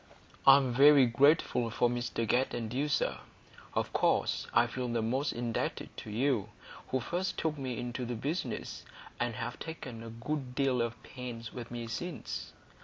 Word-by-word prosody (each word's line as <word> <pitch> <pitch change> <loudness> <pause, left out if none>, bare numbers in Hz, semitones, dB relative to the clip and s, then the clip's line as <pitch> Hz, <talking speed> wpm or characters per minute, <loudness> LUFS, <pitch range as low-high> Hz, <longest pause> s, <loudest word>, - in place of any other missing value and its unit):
"I'm 135 -2 +7
very 140 +1 +8
grateful 130 -1 +3
to 115 - -9
Mr 120 -1 -2
Guest 125 +3 +2
and 115 -1 -4
you, 140 +4 0
sir; 145 - 0 0.6
of - - -1
course - - +2
I 120 - +5
feel 125 +1 -3
the 120 -1 0
most 130 +6 0
indebted 120 -1 -3
to - - -7
you, 115 -2 +1 0.4
who 130 - 0
first 175 - -2
took 160 -2 0
me 130 -4 -4
into 120 +1 -3
the 120 0 -3
business, 145 +10 -3 0.4
and 120 -2 -1
have 115 0 -4
taken 130 -8 -7
a 115 - -7
good 125 +3 -4
deal 135 -3 +2
of 115 0 -3
pains 120 -3 -7
with 120 -2 -7
me 120 -1 -5
since." 170 +9 -5
125 Hz, 170 wpm, -32 LUFS, 115-140 Hz, 0.6 s, very